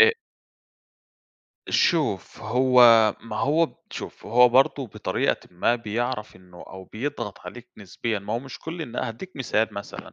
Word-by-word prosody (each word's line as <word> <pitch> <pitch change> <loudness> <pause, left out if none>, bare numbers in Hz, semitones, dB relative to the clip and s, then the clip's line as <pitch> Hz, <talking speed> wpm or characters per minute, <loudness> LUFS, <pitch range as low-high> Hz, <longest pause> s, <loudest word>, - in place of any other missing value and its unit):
أ 460 0 +8 1.6
شوف 155 - +1
هو 125 +3 +3 0.4
ما 110 -2 -7
هو 160 +3 +1 0.2
شوف، - - -8
هو 125 +2 +6
برضو 135 +1 +3
بطريقةً - - -1
ما 90 +7 +1
بيعرف 115 -1 -4
إنه 90 -1 -15
أو 95 0 -11
بيضغط 115 -3 -5
عليك 125 0 -10
نسبيًا 105 +2 -4
ما 100 +2 -6
هو 115 - 0
مش 130 0 -10
كل 165 +1 -6
إن 120 -6 -8
هأديك 145 +11 -5
مثال 110 -4 0
مثلًا، 100 - -8
120 Hz, 140 wpm, -24 LUFS, 105-135 Hz, 1.6 s, أ